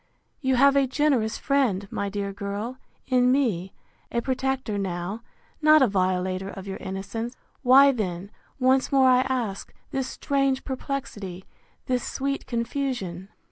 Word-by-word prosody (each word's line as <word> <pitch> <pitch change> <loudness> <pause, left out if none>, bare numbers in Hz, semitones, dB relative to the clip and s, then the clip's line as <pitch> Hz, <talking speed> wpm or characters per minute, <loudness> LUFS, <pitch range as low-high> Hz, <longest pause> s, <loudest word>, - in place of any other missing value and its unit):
You 265 -3 +1
have 275 +2 +5
a 275 -1 +4
generous 260 -5 +1
friend, 245 -9 +1
my 200 - -2
dear 200 0 -3
girl, 205 +5 -4 0.3
in 250 -1 +3
me; 210 -10 +1 0.4
a 235 - +1
protector 260 -3 -1
now, 190 +3 -3 0.4
not 310 -1 +7
a - - +5
violator 185 -1 0
of 195 -1 -8
your 195 -1 -5
innocence: 225 +5 -5 0.3
Why 275 +2 +7
then, 195 -5 -4 0.3
once 260 0 +3
more 270 -1 +5
I 250 0 +5
ask, 230 -7 -2 0.2
this 270 -3 -1
strange 275 -1 0
perplexity, 235 -9 -5 0.4
this 250 -1 0
sweet 275 +1 -3
confusion? 235 -7 -3
240 Hz, 140 wpm, -25 LUFS, 195-265 Hz, 0.4 s, not